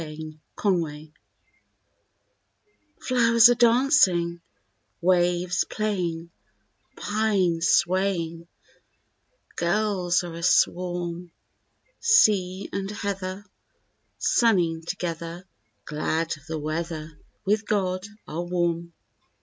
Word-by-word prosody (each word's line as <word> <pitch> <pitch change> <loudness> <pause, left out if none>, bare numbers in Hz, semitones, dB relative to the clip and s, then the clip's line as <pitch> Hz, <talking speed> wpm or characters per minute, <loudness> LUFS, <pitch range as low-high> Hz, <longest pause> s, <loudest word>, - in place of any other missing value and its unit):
SENSE 155 0 -7 0.3
SWEETNESS 160 -6 -1 1.9
Flowers 230 -2 +5
are - - +5
dancing, 230 - +3 0.6
waves 180 0 +2
playing, 175 -6 -3 0.7
pines 195 -6 +1
swaying, 175 -3 +1 1.1
gulls 180 -1 +1
are 175 -1 -7
a 170 - -7
swarm; 175 0 0 0.7
Sea 200 - +3
and 195 0 -3
heather, 200 -1 -4 0.7
sunning 175 -9 +2
together, 170 0 -5 0.4
glad 160 +2 -2
of 150 -1 -19
the 160 - -3
weather, 155 0 -5 0.3
with 210 +2 0
God 185 -2 -1 0.2
are 160 +3 -4
warm. 170 -1 -2
175 Hz, 80 wpm, -25 LUFS, 165-200 Hz, 1.9 s, Flowers